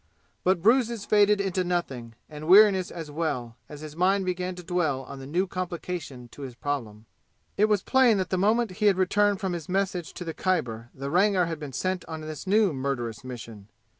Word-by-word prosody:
But 180 -2 +2
bruises 230 -2 +3
faded 210 -1 +4
into 190 -2 0
nothing, 135 -10 -3
and 150 0 -9
weariness 190 -1 +6
as 160 -3 -7
well, 130 -7 -3
as 150 -1 -9
his 155 -1 -9
mind 190 +3 +2
began 180 0 -2
to 180 - -9
dwell 160 -6 -1
on 140 +1 -9
the 135 - -9
new 175 +6 0
complication 175 -8 -5
to 145 - -13
his 130 -3 -7
problem. 115 -6 -4 0.5
It 210 - +4
was 210 -3 +1
plain 260 -5 +4
that 185 - -2
the 185 - +1
moment 220 +2 +2
he 210 - +5
had 195 -2 +4
returned 205 +2 +2
from 190 -2 -2
his 170 -2 -6
message 185 -3 -1
to 180 - -6
the 165 - -4
Khyber 120 -13 -2
the 140 +1 -5
Rangar 185 0 +3
had 165 -2 -4
been 145 -3 -7
sent 185 +7 -2
on 160 -1 -7
this 155 +2 -7
new 205 -3 +3
murderous 130 -3 -3
mission. 115 -5 -9
175 Hz, 200 wpm, -26 LUFS, 140-195 Hz, 0.5 s, weariness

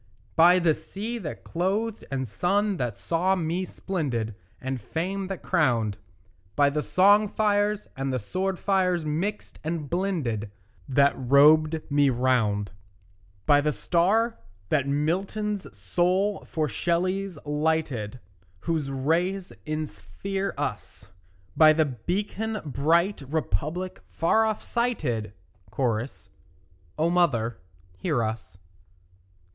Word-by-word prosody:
By 175 +2 +7
the 170 -3 +3
sea 220 +9 -5
that 160 -8 -6
clothed 200 +6 -1
and 130 -2 -2
sun 195 - +1
that 120 -7 -2
saw 175 - +1
me 175 +1 -1
splendid 135 - -3 0.3
And 130 -2 -4
fame 185 - -3
that 195 -1 -6
crowned, 120 - +2 0.6
By 145 -1 +4
the 150 +1 0
song 205 +6 +5
fires 205 0 +1
and 135 0 -2
the 130 - 0
sword 185 - -2
fires 180 -4 +1
mixed 175 +8 -3
and 155 -2 -3
blended 155 - -1 0.4
That 140 +1 +4
robed 150 +4 +5
me 145 -1 +4
round; 120 -5 +1 0.7
By 145 0 +5
the 150 +1 +1
star 205 +10 +1 0.3
that 140 -3 +1
Milton's 185 - -1
soul 180 - 0
for 155 -2 -1
Shelley's 180 - -1
lighted, 150 -7 -1 0.4
Whose 160 -4 -1
rays 170 +8 0
insphere 155 - -4
us; - - -5 0.4
By 155 -1 +7
the 160 0 +3
beacon 200 - -3
bright 165 +7 +2
Republic 160 - -2
far 220 +7 +2
off 215 -1 -2
sighted; 140 - -1 0.4
(Cho.) 115 -4 +1 0.9
O 165 +2 +2
mother, 120 - +1 0.4
hear 145 - 0
us. 110 -3 -5
160 Hz, 115 wpm, -26 LUFS, 135-190 Hz, 0.9 s, By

